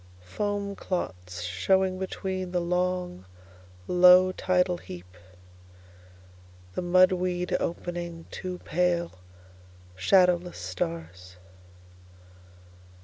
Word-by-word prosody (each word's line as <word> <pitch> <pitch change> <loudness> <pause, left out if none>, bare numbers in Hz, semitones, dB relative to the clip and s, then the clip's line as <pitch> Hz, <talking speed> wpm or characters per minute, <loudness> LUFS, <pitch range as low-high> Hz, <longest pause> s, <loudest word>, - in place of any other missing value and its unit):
Foam 200 - -3
clots 90 - -4
showing 185 - +1
betweenThe 185 -1 -4
long, 180 - -1 0.6
low 180 +1 +7
tidal 180 -1 +1
heap, 90 +1 -11 1.6
The - - -2
mud 185 +1 +5
weed 180 -1 -1
opening 170 -1 -4
two 185 -1 -5
pale, 175 - 0 0.8
shadowless 180 - +3
stars. 90 0 -5
180 Hz, 75 wpm, -27 LUFS, -, 1.6 s, low